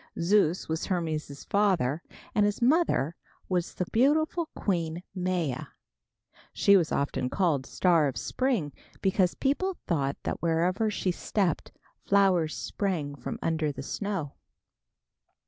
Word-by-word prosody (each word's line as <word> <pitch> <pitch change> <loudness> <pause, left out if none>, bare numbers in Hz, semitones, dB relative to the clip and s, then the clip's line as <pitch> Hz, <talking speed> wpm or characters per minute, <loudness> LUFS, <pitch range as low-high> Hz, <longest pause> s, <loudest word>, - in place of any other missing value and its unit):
Zeus 180 -1 +2
was 160 0 -2
Hermes' 155 -6 -2
father 180 -8 +1 0.3
and 210 - +3
his 205 0 +1
mother 245 - +2 0.3
was 180 -2 -1
the 180 - -1
beautiful 310 +7 +2
Queen 170 -3 -1
Maia. 180 -7 -1 0.9
She 200 - +5
was 170 -5 +3
often 135 -2 -1
called 150 -8 +1
"Star 170 -5 +3
of 135 - -3
Spring," 240 - -1 0.3
because 190 -2 +2
people 355 +7 0
thought 140 -5 0
that - - -3
wherever 175 +6 +1
she 190 -2 -1
stepped 180 -1 -1 0.3
flowers 190 -6 +3
sprang 170 -8 -2
from 130 -4 -6
under 160 -2 0
the 140 - -7
snow. 190 -3 -3
180 Hz, 125 wpm, -28 LUFS, 155-200 Hz, 0.9 s, She